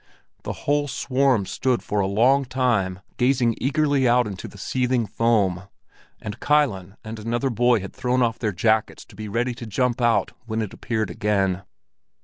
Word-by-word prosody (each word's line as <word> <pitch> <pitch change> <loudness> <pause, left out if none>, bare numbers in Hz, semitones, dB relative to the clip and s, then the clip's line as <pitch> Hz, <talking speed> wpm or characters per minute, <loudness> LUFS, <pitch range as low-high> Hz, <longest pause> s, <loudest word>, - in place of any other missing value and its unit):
The - - -4
whole 145 0 +2
swarm 130 -5 +1
stood 125 +4 -1
for 105 - -1
a 95 - +1
long 125 +8 +3
time 120 -8 0 0.2
gazing 125 -2 +2
eagerly 140 0 +2
out 125 +1 +4
into 100 -3 -6
the - - -13
seething 125 +2 0
foam, 100 -6 +1 0.5
and 105 -1 -7
Kilen 110 -11 +1
and 110 0 -7
another 120 +5 -1
boy 120 -1 +3
had 100 - -8
thrown 125 -1 +1
off 115 -1 0
their 110 -3 0
jackets 110 +4 0
to - - -17
be 105 +1 -6
ready 120 +4 -1
to 115 0 -8
jump 125 +3 0
out 120 -1 +2 0.2
when 110 0 -1
it 105 - -6
appeared 110 -3 -2
again. 100 -4 0
115 Hz, 170 wpm, -23 LUFS, 105-130 Hz, 0.5 s, out